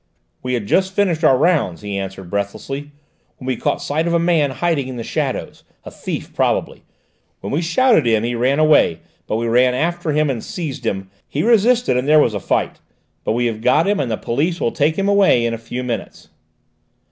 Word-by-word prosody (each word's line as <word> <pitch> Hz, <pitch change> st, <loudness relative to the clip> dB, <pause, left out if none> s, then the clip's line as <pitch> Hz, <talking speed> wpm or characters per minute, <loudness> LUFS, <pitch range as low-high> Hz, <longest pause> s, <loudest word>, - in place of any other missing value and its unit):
"We 125 Hz, 0 st, -2 dB
had 115 Hz, -4 st, -3 dB
just 190 Hz, -, +1 dB
finished 175 Hz, -5 st, +1 dB
our 135 Hz, -4 st, +5 dB
rounds," 140 Hz, -, +1 dB
he 100 Hz, -1 st, -4 dB
answered 95 Hz, -2 st, -6 dB
breathlessly, 135 Hz, +8 st, -4 dB, 0.5 s
"when 130 Hz, -, -11 dB
we 130 Hz, -1 st, 0 dB
caught -, -, -2 dB
sight 155 Hz, +4 st, -1 dB
of 170 Hz, -, +1 dB
a -, -, +5 dB
man 165 Hz, -4 st, +2 dB
hiding 140 Hz, +1 st, -1 dB
in 130 Hz, -, -6 dB
the 115 Hz, -, -4 dB
shadows, -, -, -3 dB, 0.2 s
a -, -, -9 dB
thief -, -, -6 dB
probably. -, -, -1 dB, 0.6 s
When -, -, -5 dB
we 155 Hz, -, +1 dB
shouted 175 Hz, -, +3 dB
to -, -, +2 dB
him 110 Hz, -, -1 dB
he 120 Hz, +1 st, -1 dB
ran 125 Hz, +4 st, +1 dB
away, 155 Hz, -, +3 dB, 0.3 s
but -, -, -1 dB
we 115 Hz, +1 st, -1 dB
ran 125 Hz, +2 st, +3 dB
after 170 Hz, +4 st, -1 dB
him 150 Hz, +1 st, +2 dB
and 130 Hz, -5 st, -3 dB
seized 140 Hz, -8 st, -5 dB
him; 95 Hz, -2 st, -3 dB, 0.2 s
he 145 Hz, -, -1 dB
resisted 235 Hz, -, +3 dB
and 125 Hz, +2 st, -1 dB
there 155 Hz, +1 st, +6 dB
was 135 Hz, -7 st, +3 dB
a 100 Hz, -, -2 dB
fight. -, -, -1 dB, 0.4 s
But -, -, 0 dB
we 120 Hz, +1 st, 0 dB
have 110 Hz, -2 st, -2 dB
got 130 Hz, +9 st, +3 dB
him 205 Hz, 0 st, +1 dB
and 130 Hz, -, -1 dB
the 110 Hz, -, -1 dB
police 160 Hz, +9 st, -1 dB
will 115 Hz, -, 0 dB
take 150 Hz, +2 st, +1 dB
him 195 Hz, +2 st, -1 dB
away 200 Hz, -12 st, +4 dB
in 115 Hz, -, -1 dB
a 115 Hz, -, -5 dB
few 120 Hz, +2 st, -5 dB
minutes." 120 Hz, -2 st, -5 dB
135 Hz, 215 wpm, -19 LUFS, 115-165 Hz, 0.6 s, there